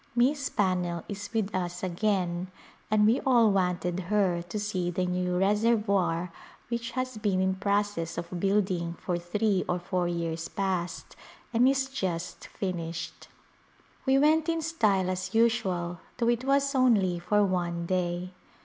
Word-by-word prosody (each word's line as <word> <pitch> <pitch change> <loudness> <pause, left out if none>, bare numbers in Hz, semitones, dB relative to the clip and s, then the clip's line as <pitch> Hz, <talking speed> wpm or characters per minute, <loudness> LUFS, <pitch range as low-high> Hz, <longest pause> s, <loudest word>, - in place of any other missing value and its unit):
Miss 275 +3 +2
Pannell 180 -4 0
is 205 0 -6
with 220 -3 -1
us 180 -1 -3
again 180 -1 0 0.4
and 210 -1 +4
we 225 +4 +4
all 235 -5 +4
wanted 180 -2 0
her 195 -5 +2
to 175 +5 -5
see 190 -4 -1
the 180 +1 -1
new 180 0 -1
reservoir 200 -4 +2 0.4
which 235 0 -2
has 255 -3 -2
been 200 -3 +1
in 190 0 +2
process 200 -3 -1
of 170 +1 -4
building 185 -3 0
for 175 0 -3
three 195 +3 0
or 180 - +1
four 180 0 -1
years 165 -1 -2
past 185 -3 -3 0.4
and 245 +3 +5
is 270 -1 +1
just 185 -10 -4
finished. 170 -3 -5 0.8
We 265 0 +5
went 310 +3 +3
in 330 -1 0
style 215 - +1
as 185 +3 -3
usual 185 -7 +1 0.2
though 235 -1 +1
it 240 +1 0
was 275 +1 +2
only 210 -9 +3
for 210 +4 +2
one 175 -3 -1
day. 180 0 -1
190 Hz, 150 wpm, -28 LUFS, 175-225 Hz, 0.8 s, and